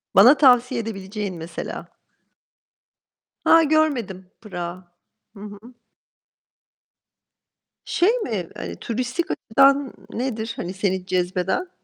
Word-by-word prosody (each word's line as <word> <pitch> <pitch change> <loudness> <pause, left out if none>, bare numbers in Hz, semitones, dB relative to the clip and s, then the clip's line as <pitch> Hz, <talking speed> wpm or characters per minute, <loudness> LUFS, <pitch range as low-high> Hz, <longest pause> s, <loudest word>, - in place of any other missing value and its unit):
Bana 245 +10 +8
tavsiye 250 -3 +4
edebileceğin 200 -2 -5
mesela? 165 0 -7 1.6
Ha, 330 0 +7
görmedim. 255 - 0
Prag'ı. 180 -4 -6 0.5
Hı - - -12
hı. 205 -1 -9 2.3
Şey 360 - +2
mi, 210 - -3
hani, - - -6
turistik 250 +8 -3
açıdan 275 +3 +3 0.2
nedir, 230 -2 -3
hani, 180 -3 -5
seni 190 -1 -2
cezbeden? 185 - -1
220 Hz, 90 wpm, -22 LUFS, 190-260 Hz, 2.3 s, Bana